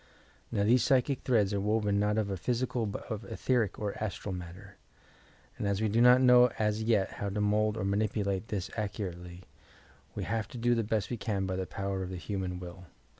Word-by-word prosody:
Now, 100 - +1
these 120 +4 +4
psychic 135 -1 +2
threads 105 -6 +2
are 100 - 0
woven 105 -1 +1
not 105 +1 +1
of 100 -4 -1
physical 120 0 -1
but 100 - -5
of 110 -1 -3
etherie 115 0 0
or 105 -2 -3
astral 100 -1 -4
matter, 90 +3 -9 0.8
and 100 - -1
as 100 -1 0
we 110 - +1
do 115 +3 +2
not 125 +1 +7
know 125 -1 +7
as 105 0 0
yet 110 -4 +2
how 100 - -4
to 100 +2 -3
mould 105 +1 +1
or 95 - -2
manipulate 100 0 0
this 95 -3 -3
accurately, 90 -4 -5 0.7
we - - -3
have 110 +1 -2
to 135 - -9
do 120 +1 +2
the 115 -1 +1
best 110 +1 -1
we 120 - -2
can 100 -3 -2
by 95 0 -2
the 95 0 -3
power 95 +3 -3
of 90 - -4
the 95 - -5
human 90 +1 -4
will. 90 0 -9
105 Hz, 205 wpm, -30 LUFS, 95-115 Hz, 0.8 s, not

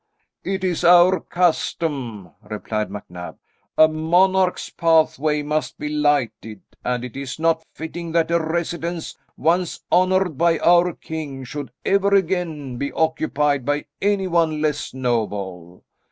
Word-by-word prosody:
"It 190 -1 -3
is 180 -2 -1
our 175 +2 +6
custom," 140 - -1
replied 105 -1 -4
MacNab. 90 -3 -8 0.4
"A 155 - +8
monarch's 180 +4 +2
pathway 155 -2 +2
must 150 +1 -2
be 150 - -4
lighted, 145 -8 0 0.2
and 125 0 -1
it 125 - -9
is 135 -2 -5
not 160 0 +1
fitting 165 +1 -6
that 165 0 +2
a 170 - +3
residence 170 +1 -3 0.2
once 170 +2 0
honoured 185 -4 +2
by 170 -1 +3
our 175 +1 +4
king 150 -5 -6
should 140 0 -6 0.2
ever 200 0 +3
again 165 -8 -1
be 140 +2 -3
occupied 150 -3 +1
by 145 +3 -1 0.2
anyone 175 -6 +1
less 150 -1 -1
noble. 100 -8 -3
155 Hz, 125 wpm, -22 LUFS, 135-175 Hz, 0.4 s, A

